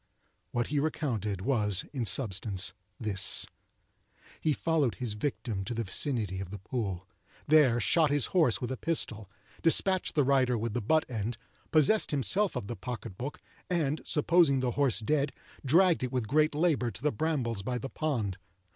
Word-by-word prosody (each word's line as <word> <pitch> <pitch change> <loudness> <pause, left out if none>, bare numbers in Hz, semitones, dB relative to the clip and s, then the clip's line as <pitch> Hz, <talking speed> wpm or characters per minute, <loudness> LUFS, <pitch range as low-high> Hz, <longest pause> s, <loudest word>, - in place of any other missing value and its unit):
What 120 -1 -1
he 145 0 +1
recounted 120 - -2
was 105 -4 +1
in 125 -4 -2
substance 100 -5 +1 0.3
this:—He 105 - -3
followed 150 - +1
his 115 0 -3
victim 105 -4 -3
to 120 - -4
the 115 - -1
vicinity 105 -2 -1
of 95 - -6
the 105 - -6
pool; 95 -3 -4 0.4
there 140 -6 +5
shot 155 +7 +3
his 145 -2 +2
horse 160 -10 +3
with 125 - -4
a 130 - -3
pistol; 110 - -2 0.3
despatched 185 +1 +1
its 145 - +4
rider 130 -3 +3
with 115 0 -3
the 120 - -1
butt 155 +9 +2
end; 115 -1 -3 0.3
possessed 160 +7 +3
himself 185 +8 0
of - - -3
the 120 - -5
pocket 105 -1 -6
book; 130 +8 -6 0.3
and, 160 -4 0
supposing 155 -2 +3
the 125 -1 0
horse 135 -3 +1
dead, 140 +4 0 0.3
dragged 170 +5 +4
it 125 -1 -2
with 125 -4 -1
great 155 +4 +2
labour 150 -6 +2
to 115 - -9
the 150 - +2
brambles 125 -6 -1
by 125 +5 -2
the 135 - -5
pond. 120 - -2
130 Hz, 165 wpm, -30 LUFS, 110-150 Hz, 0.4 s, there